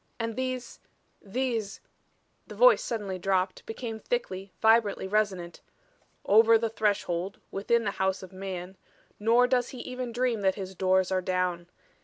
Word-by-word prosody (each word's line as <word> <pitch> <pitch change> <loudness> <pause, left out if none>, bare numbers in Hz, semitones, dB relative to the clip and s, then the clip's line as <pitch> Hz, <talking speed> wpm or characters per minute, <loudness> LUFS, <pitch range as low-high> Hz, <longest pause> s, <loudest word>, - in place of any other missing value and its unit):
"And 230 -1 -3
these 255 -1 -4 0.4
these 225 -1 -2 0.3
" - - -43
the - - -9
voice - - +6
suddenly 200 -5 -3
dropped, 185 0 0
became 225 0 -5
thickly, 195 - -3
vibrantly 220 -3 +3
resonant, 190 -4 -1 0.6
"over 225 +2 +6
the 225 0 -1
Threshold, 200 -4 -1
within 230 +4 +1
the 200 - -1
House 190 0 -1
of 185 - -11
Man 185 -1 -6 0.4
nor 230 +4 +4
does 250 -1 +1
he 260 - -9
even 250 -1 -5
dream 240 -2 0
that 190 -1 +2
his 190 -2 -6
doors 190 0 +2
are 185 0 +1
down. 180 -1 -1
205 Hz, 150 wpm, -28 LUFS, 190-230 Hz, 0.6 s, voice